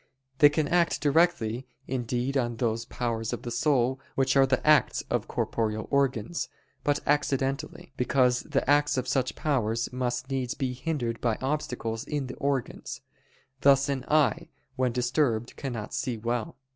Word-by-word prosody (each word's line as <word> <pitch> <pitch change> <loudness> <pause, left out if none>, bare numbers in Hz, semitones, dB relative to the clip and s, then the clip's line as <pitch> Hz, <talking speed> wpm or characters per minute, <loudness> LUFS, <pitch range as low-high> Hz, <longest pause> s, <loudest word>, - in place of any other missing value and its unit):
They 145 - +9
can 150 0 0
act 175 -1 +2
directly 145 -6 +2 0.2
indeed 125 +1 -2
on 120 -3 0
those 115 -1 -1
powers 115 -2 -2
of - - -5
the 120 - -4
soul 130 -1 +2 0.2
which 135 0 +2
are 135 -1 +6
the 130 -1 0
acts 155 -1 +4
of - - 0
corporeal 110 -1 -1
organs, 140 +1 0 0.3
but 145 0 +1
accidentally: 140 -1 -1
because 125 -1 +3
the 140 -4 -1
acts 145 0 +3
of 130 0 -1
such 130 -1 0
powers 115 -5 0
must 125 +1 -2
needs 130 -2 -1
be 130 -3 -2
hindered 125 -4 -3
by 115 -3 +1
obstacles 125 -5 -2
in 145 -3 -3
the 125 - -7
organs; 140 -4 -2 0.6
thus 140 +1 +5
an 135 -2 -1
eye 150 -2 +2 0.3
when 130 -1 +1
disturbed 120 -1 0
cannot 120 -6 -5
see 125 -4 -2
well. 115 +1 -3
130 Hz, 155 wpm, -28 LUFS, 120-140 Hz, 0.6 s, They